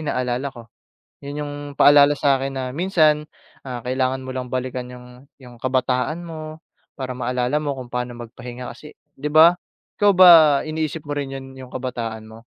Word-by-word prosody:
ina-alala 125 +2 -2
ko. 120 - -11 0.6
Yun 145 +1 -5
yung 145 - -6 0.3
paalala 145 0 +7
sa'kin 135 -1 +1
na 130 - -3
minsan 155 -4 +2 0.4
ah 125 -2 -6
kailangan 130 +1 -1
mo 130 - -6
lang 130 -1 -4
balikan 130 -1 -4
yung 125 +2 -13
yung 125 -2 -14
kabataan 130 +5 -1
mo 155 -1 -9 0.3
para 130 -2 -4
maalala 125 +3 -1
mo 145 -2 -2
kung 125 -1 -9
pa'no 125 0 -3
magpahinga 120 +1 -8
kasi 150 +6 -13 0.2
'di 150 - -2
ba. 165 +3 +7 0.4
Ikaw 205 -1 +5
ba, 185 -1 +9 0.4
iniisip 155 -1 -4
mo 145 - -3
rin 140 -2 -4
yun 135 0 -8
yung 130 -1 -11
kabataan 115 -4 -5
mo? 110 +1 -13
130 Hz, 170 wpm, -21 LUFS, 125-150 Hz, 0.6 s, ba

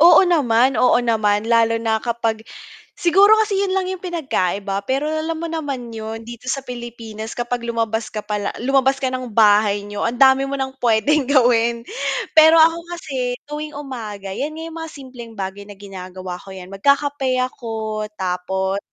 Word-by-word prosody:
Oo 340 +2 +8
naman, 260 -6 +3
oo 250 - +5
naman. 210 -2 +1
Lalo 230 -1 +3
na 225 -1 0
kapag 230 -2 -1 0.6
siguro 385 +4 +5
kasi 415 -2 -1
'yon 390 -1 0
lang 375 -1 0
yung 375 -1 -6
pinagkaiba, 200 - -2
pero 270 +3 0
alam 315 +1 -2
mo 335 - -3
naman 275 -7 -4
'yon, 220 +1 -6
dito 240 +1 -9
sa 275 0 -2
Pilipinas 230 -3 -7
kapag 240 0 -2
lumabas 230 -1 -2
ka 215 -1 -5
pala 210 -1 -2
lumabas 270 +2 +2
ka 270 - -1
ng 255 -1 -4
bahay 205 -1 +4
niyo, 205 0 -5
ang 235 +1 -1
dami 270 +1 +5
mo 280 - -2
ng 265 0 -3
puwedeng 245 +5 +2
gawin. 235 -3 +3 0.5
Pero 320 +1 +8
ako 325 +1 +5 0.2
kasi 260 -6 -3
tuwing 300 0 -6
umaga, 220 -9 -6
'yan 295 +8 -3
nga 320 - -6
yung 330 0 -8
mga 325 - -7
simpleng 255 -5 -11
bagay 195 +1 -5
na 205 - -11
ginagawa 185 -2 -8
ko, 195 - -12
'yan, 185 -1 -9
magkakape 280 +4 +1
ako 220 -4 -4
tapos 190 +1 -1
240 Hz, 170 wpm, -20 LUFS, 215-280 Hz, 0.6 s, Oo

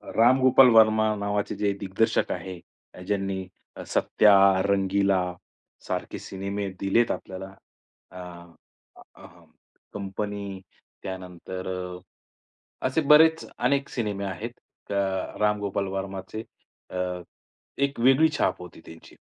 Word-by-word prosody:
राम 125 +4 +5
गोपाल 130 0 +7
वर्मा 110 -1 +5
नावाचे 100 0 -2
जे 100 -1 0
दिग्दर्शक 105 +4 0
आहेत, 95 -2 -7 0.5
ज्यांनी 95 -2 -2 0.4
सत्या, 105 -2 +4 0.3
रंगीला, 100 -1 +2 0.7
सारखे - - -4
सिनेमे 100 +1 -4
दिलेत 105 +5 +2
आपल्याला, 95 +1 -6 0.6
अ, 90 - -10 1.0
अ, - - -14 0.7
कंपनी 100 0 -5 0.4
त्यानंतर 95 0 -7
अ, 90 -1 -5 0.9
असे 145 +5 0
बरेच 160 +2 +5
अनेक 140 +2 +1
सिनेमे 105 -4 -3
आहेत, 100 +5 -5 0.4
अ, 100 - -1 0.5
राम 105 0 +2
गोपाल 100 -1 -2
वर्माचे, 95 +3 -6 0.5
अ, - - -5 0.9
एक 140 -2 -1
वेगळी 135 +5 +5
छाप - - +1
होती 90 -2 -11
त्यांची. 80 0 -14
100 Hz, 105 wpm, -26 LUFS, 95-110 Hz, 1.0 s, गोपाल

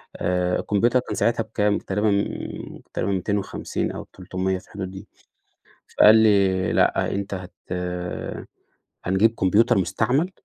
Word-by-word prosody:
آآ 90 0 0
الكمبيوتر 120 +5 +2
كان - - -5
ساعتها 115 0 +1
بكام؟ 105 -2 0
تقريبًا، 105 +2 -1 0.8
تقريبًا 100 - -1
250 100 +2 -2
أو - - -6
300 95 0 -2
في 90 - -13
الحدود 95 -2 -6
دي. 95 - -10 0.9
فقال 105 +1 +8
لي: 100 -5 +3
"لأ، - - +2
أنت 100 0 -3
هت 90 -1 -7 1.5
هنجيب 105 +5 +3
كمبيوتر 100 +4 +3
مستعمل، 120 - +1
100 Hz, 120 wpm, -23 LUFS, 95-110 Hz, 1.5 s, فقال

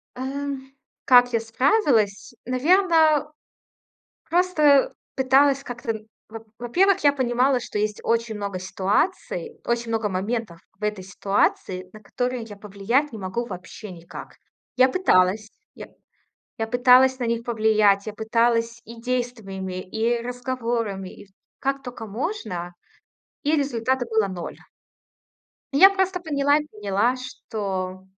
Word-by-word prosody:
Эм, 270 +1 -5 0.3
как 245 -1 +6
я 230 - +2
справилась? 225 - +1
Наверно, 310 +2 +3 1.0
просто 310 -6 +4 0.2
пыталась 270 +1 +3
как-то 240 -2 -4
н 215 -1 -8 0.2
во 225 +1 -7 0.2
во-первых, 365 +11 +2
я 285 - +6
понимала, 255 0 +1
что 210 - -4
есть 210 0 -2
очень 230 -1 0
много 200 -2 -4
ситуаций, 265 - -2
очень 235 0 -1
много 220 -2 0
моментов 195 -1 -3 0.2
в 210 - -14
этой 210 -3 -2
ситуации, 190 -1 -1
на 215 - -12
которые 250 +2 -3
я 210 -2 -10
повлиять 210 +8 -1
не - - -6
могу 200 +5 -3
вообще 185 +1 -9
никак. 170 -1 -11 0.4
Я 255 +1 +5
пыталась. 210 - +2 0.2
Я - - -10 0.7
я 225 - -1
пыталась 255 +2 +5
на 250 - -2
них 230 0 -1
повлиять, 215 -3 +3
я 215 - -4
пыталась 230 +1 0
и 230 +1 -11
действиями, 225 -7 -3
и 225 +5 -1
разговорами, 235 -5 -3
и - - -14
в - - -30 0.3
как 275 0 -2
тока 245 -3 -8
можно, 205 - -4 0.7
и 300 +2 +2
результата 260 -3 0
было 220 -3 +1
0. 180 -3 -7 1.2
Я 310 +8 +8
просто 380 -1 0
поняла 290 -3 +2
поняла, 210 +3 0
что 195 -7 -5
235 Hz, 130 wpm, -23 LUFS, 210-265 Hz, 1.2 s, Я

